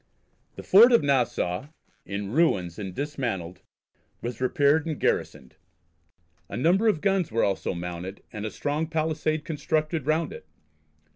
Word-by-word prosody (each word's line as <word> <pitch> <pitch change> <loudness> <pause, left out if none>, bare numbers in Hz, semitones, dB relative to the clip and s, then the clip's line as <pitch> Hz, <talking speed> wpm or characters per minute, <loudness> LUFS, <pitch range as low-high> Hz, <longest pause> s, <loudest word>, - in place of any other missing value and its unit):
The - - -8
fort 230 +6 +7
of 235 - +5
Nassau, 130 -5 0 0.4
in 100 0 -4
ruins 100 - +1
and 95 -2 -5
dismantled, 115 - -4 0.6
was 120 0 -6
repaired 145 +4 +2
and 155 -3 -3
garrisoned. 65 - -2 0.9
A - - -5
number 180 - +3
of 175 -8 +2
guns 195 - +1
were 115 - +1
also 95 -1 -1
mounted, 90 +2 -6
and 105 -2 -5
a 110 - -2
strong 150 +7 -2
pallisade 155 -1 -1
constructed 155 -2 -1
round 155 0 +1
it. - - -11
145 Hz, 140 wpm, -26 LUFS, 100-160 Hz, 0.9 s, fort